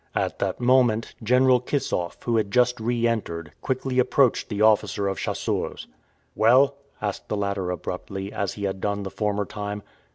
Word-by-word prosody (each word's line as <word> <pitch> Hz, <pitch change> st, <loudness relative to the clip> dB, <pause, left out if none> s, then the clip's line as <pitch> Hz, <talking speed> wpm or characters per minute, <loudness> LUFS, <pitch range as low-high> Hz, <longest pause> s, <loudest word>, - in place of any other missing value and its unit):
At -, -, -1 dB
that -, -, -1 dB
moment. 120 Hz, -3 st, +3 dB
General 125 Hz, +2 st, +4 dB
Kissoff, 125 Hz, -, -2 dB
who 120 Hz, -1 st, +1 dB
had 105 Hz, -2 st, 0 dB
just 125 Hz, +1 st, +2 dB
re 120 Hz, +1 st, 0 dB
entered, 85 Hz, -8 st, -3 dB
quickly 130 Hz, -1 st, -1 dB
approached 125 Hz, 0 st, +3 dB
the 105 Hz, -, -3 dB
officer 105 Hz, -2 st, +3 dB
of 95 Hz, -, -2 dB
chasseurs. -, -, -2 dB, 0.5 s
"Well?" 130 Hz, +5 st, +5 dB, 0.3 s
asked 100 Hz, -2 st, -3 dB
the 105 Hz, -, -1 dB
latter 100 Hz, -2 st, -1 dB
abruptly, 95 Hz, +3 st, -5 dB
as 100 Hz, -2 st, -2 dB
he 105 Hz, -, -7 dB
had 95 Hz, -1 st, -2 dB
done 100 Hz, 0 st, -1 dB
the 95 Hz, -, -5 dB
former 105 Hz, -1 st, -1 dB
time. 105 Hz, +1 st, -5 dB
110 Hz, 165 wpm, -25 LUFS, 100-125 Hz, 0.5 s, Well